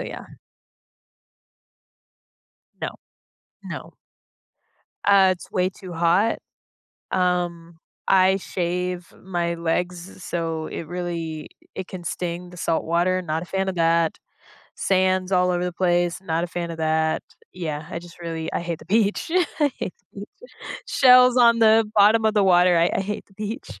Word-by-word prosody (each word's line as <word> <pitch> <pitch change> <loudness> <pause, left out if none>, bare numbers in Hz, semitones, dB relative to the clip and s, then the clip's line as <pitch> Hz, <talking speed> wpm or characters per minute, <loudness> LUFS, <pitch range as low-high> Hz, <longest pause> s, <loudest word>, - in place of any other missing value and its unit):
yeah. - - -7 2.5
No. - - -4 0.7
No. - - -8 1.1
Uh, 195 -2 +6
it's 180 - -7
way 185 0 +1
too 185 -2 -10
hot. 175 +7 +2 0.7
Um, 175 -2 -1 0.3
I 190 0 +5
shave 180 -1 -3
my 175 -2 -1
legs 175 +2 -3
so 165 -2 -3
it 160 - -6
really 170 -3 -4
i - - -8
it 180 - -11
can 185 -2 -8
sting, 175 +1 -4
the 180 - -13
salt 165 0 0
water, 175 +3 +1
not 160 -2 -2
a - - -10
fan 190 +1 -1
of 190 - -4
that. 165 -1 +2 0.6
Sand's 185 -1 +1
all 180 -1 +3
over 175 0 -1
the 180 - -2
place, 175 0 +1
not 165 -3 -1
a - - -3
fan 175 -1 -4
of 165 - -9
that. 160 0 +1 0.3
Yeah, 155 -4 -5
I 170 - -5
just 175 0 -14
really 165 -1 -4
I - - -1
hate 170 -2 -4
the - - -13
beach. 210 - +1 0.3
I 290 -2 +4
hate - - -4 0.2
the - - -9
beach. - - -13 0.4
Shells 250 -1 +6
on 235 -2 +6
the 220 0 +6
bottom 220 +2 +5
of 220 0 +2
the 205 - +4
water, 180 -1 +5
I 170 +1 +3
I - - 0
hate 205 +2 -4
the 195 - -24
beach. 210 - -6
180 Hz, 155 wpm, -23 LUFS, 170-190 Hz, 2.5 s, Uh